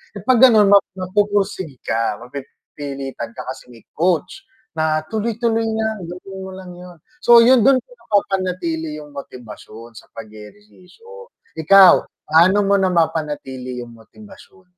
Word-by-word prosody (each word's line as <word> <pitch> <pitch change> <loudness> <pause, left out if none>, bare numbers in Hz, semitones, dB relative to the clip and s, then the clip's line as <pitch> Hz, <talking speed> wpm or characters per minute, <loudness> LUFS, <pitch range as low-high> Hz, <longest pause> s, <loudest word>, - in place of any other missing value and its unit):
Eh, 205 - -7
'pag 255 0 +3
gano'n 220 -6 +6
map 200 -1 +5
magpoporsige 195 -5 -2
ka, 115 -2 -1
mapipilitan 135 -1 -8
ka - - -7
kasi 130 -1 -9
may 115 - -16
coach 175 - -1 0.4
na 155 0 0
tuloy-tuloy 225 +1 -1
lang, 220 -4 -3
gawin 190 +2 -9
mo 190 - -9
lang 185 -1 -11
yun. 180 -1 -13 0.3
So, 240 0 +7
yun 235 0 +5
dun 270 0 +4
ko - - -23
napapanatili 180 - -2
yung 150 -1 -14
motibasyon 115 -3 -11
sa - - -12
pag-ehersisyo. 185 - -14 0.3
Ikaw, 195 +2 +8 0.3
paano 170 +6 +4
mo 200 - +3
napapanatili 150 -8 -2
yung 120 -1 -10
motibasyon? 190 - -17
180 Hz, 135 wpm, -19 LUFS, 140-205 Hz, 0.4 s, Ikaw